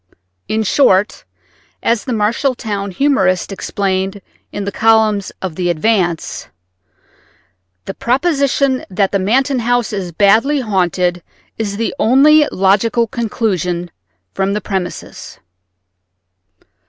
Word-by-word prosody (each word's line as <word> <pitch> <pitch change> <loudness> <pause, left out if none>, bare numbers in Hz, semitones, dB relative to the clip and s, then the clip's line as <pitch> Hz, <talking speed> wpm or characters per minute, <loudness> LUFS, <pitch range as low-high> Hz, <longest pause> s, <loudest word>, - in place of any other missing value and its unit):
In 220 0 0
short, 205 -3 +2 0.6
as 230 -2 0
the 255 - -4
Marshall 230 +4 0
town 200 -4 -4
humorist 190 -5 +1
explained 195 0 -2 0.3
in 205 - -4
the 200 - -3
columns 220 -2 +2
of 185 -3 -3
the 175 0 -1
Advance, 175 -1 -1 1.4
"the 195 - -5
proposition 275 - 0
that 195 +1 0
the 200 - +1
Manton 260 +7 +1
house 240 -1 0
is 190 -4 -4
badly 220 - +3
haunted 180 -4 0 0.4
is 200 -2 -3
the 230 - -2
only 290 +5 +5
logical 205 +5 +2
conclusion 185 -7 -2 0.4
from 195 +1 -1
the 210 - -2
premises." 190 -3 -6
210 Hz, 110 wpm, -16 LUFS, 190-240 Hz, 1.4 s, only